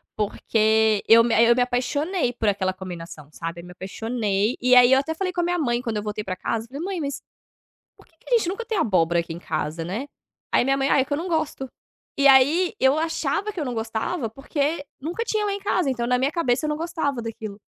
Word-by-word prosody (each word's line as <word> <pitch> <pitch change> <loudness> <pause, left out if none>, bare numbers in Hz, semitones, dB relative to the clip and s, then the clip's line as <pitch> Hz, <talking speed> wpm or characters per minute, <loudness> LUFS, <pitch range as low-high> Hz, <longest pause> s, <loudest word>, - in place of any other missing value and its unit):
porque 220 0 +2
eu 230 +1 +8
me 235 - 0
eu 235 0 +5
me 250 - +2
apaixonei 250 +4 0
por 220 -3 0
aquela 190 -2 0
combinação, 170 -5 -9
sabe, 165 +5 -6
eu - - -13
me 180 - -11
apaixonei. 210 +3 -2
E 250 0 +5
aí 250 +1 +7
eu 265 - +6
até 320 +3 -2
falei 370 +2 -2
com 350 -1 -1
a - - -1
minha 350 0 0
mãe 240 -4 0
quando 230 -3 -3
eu 210 - -3
voltei 210 0 -4
pra 185 -2 -4
casa, 225 +3 -3
falei: 280 +5 -7
"Mãe, 375 -1 -3
mas 280 -2 -4 0.7
por - - -20
que 325 - -31
que - - -5
a - - +7
gente 355 -6 -1
nunca 455 +5 -4
tem 440 - -2
abóbora 175 - +2
aqui 165 -1 -4
em 170 - -8
casa", 160 0 -3
né, 215 - -4 0.4
aí - - +4
minha 270 +1 +1
mãe 275 0 0
"Ah, - - +4
é 265 - +2
que 285 - -3
eu - - 0
não 345 +3 -4
gosto". 310 -5 -2 0.5
E 280 0 +5
aí 285 +7 +5
eu 265 +3 +4
achava 325 +5 -1
que 370 - -7
eu 295 - -2
não 250 - -3
gostava, 225 +4 -3
porque 285 +4 -2 0.2
nunca 345 +10 -3
tinha 425 -1 0
lá 405 - 0
em 400 - -4
casa, 365 -7 0
então 240 -2 -2
na 250 0 +2
minha 270 +4 +1
cabeça 305 -3 0
eu - - -1
não 300 - -1
gostava 315 -6 -2
daquilo. 215 -2 -7
250 Hz, 245 wpm, -23 LUFS, 215-315 Hz, 0.7 s, eu